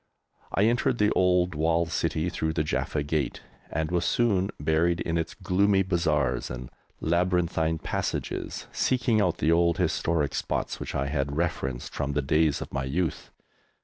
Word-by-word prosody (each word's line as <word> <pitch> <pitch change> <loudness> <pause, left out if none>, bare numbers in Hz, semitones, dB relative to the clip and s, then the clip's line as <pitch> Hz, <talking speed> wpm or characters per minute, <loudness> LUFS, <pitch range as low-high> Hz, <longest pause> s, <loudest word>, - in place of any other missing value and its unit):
I 100 - +2
entered 120 +2 +2
the 105 -1 +3
old 90 -1 +3
walled 80 +2 +1
city 80 +1 0
through 80 -2 -2
the 75 - 0
Jaffa 75 -1 -1
Gate, 75 -1 -2 0.3
and 80 +1 -2
was 90 -1 +1
soon 100 -5 +2
buried 80 +3 +2
in 85 - -2
its 85 -1 -2
gloomy 95 +1 +2
bazaars 75 -9 0
and 60 0 -7 0.3
labyrinthine 85 -1 +1
passages, - - -3
seeking 125 -4 +2
out 90 -4 +1
the 80 - +2
old 85 0 +3
historic 85 -3 0
spots - - -2
which - - -5
I 65 - 0
had 70 0 -2
reverenced 65 -7 -2
from 70 -1 -2
the 75 0 0
days 75 +1 +2
of - - -7
my 70 0 -1
youth. 80 +4 -2
80 Hz, 160 wpm, -27 LUFS, 75-90 Hz, 0.3 s, the